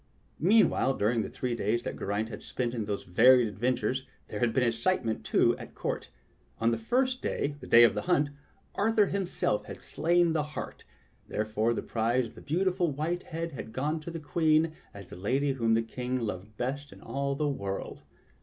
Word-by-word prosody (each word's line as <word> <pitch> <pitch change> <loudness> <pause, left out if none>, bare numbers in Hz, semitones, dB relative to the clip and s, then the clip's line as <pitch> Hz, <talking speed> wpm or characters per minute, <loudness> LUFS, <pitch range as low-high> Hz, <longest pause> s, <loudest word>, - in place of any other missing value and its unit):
Meanwhile, 175 -7 +4
during 115 +3 +1
the - - -4
three 125 -2 -3
days 115 +1 0
that - - -4
Geraint 105 +3 -1
had 105 - -7
spent 120 -2 -3
in 115 -4 -2
these 100 -1 -3
varied 125 +6 +6
adventures, 125 +4 -1 0.2
there 105 - -4
had 120 0 +2
been 125 +3 +2
excitement, 115 +1 0
too, - - +3
at - - -10
court. - - -3 0.5
On 115 +1 +3
the 115 - 0
first 255 - +1
day, 145 0 -1
the 125 - -10
day 120 +1 +8
of 115 - +6
the - - -2
hunt, 150 -5 +2 0.4
Arthur 215 0 +3
himself 185 - -1
had - - -8
slain 170 0 +2
the 155 - +2 0.2
hart; - - -6 0.4
there 105 - -1
fore 110 +2 0
the - - -3
prize 120 +2 +1
of 110 - -11
the - - -12
beautifnl 180 -1 0
white 170 +5 -1
head 165 -1 -5
had 115 -5 -8
gone 150 +6 -1
to 155 - -8
the 165 -1 -5
Queen 155 +1 +2 0.2
as 100 -3 -11
the - - -7
lady 130 +10 0
whom 115 -3 +2
the 115 - +2
King 125 +2 -3
loved 105 -1 -5
best 140 +4 -3
in - - -13
all 140 0 -2
the 150 +1 0
world. 100 -9 -4
130 Hz, 200 wpm, -29 LUFS, 115-160 Hz, 0.5 s, day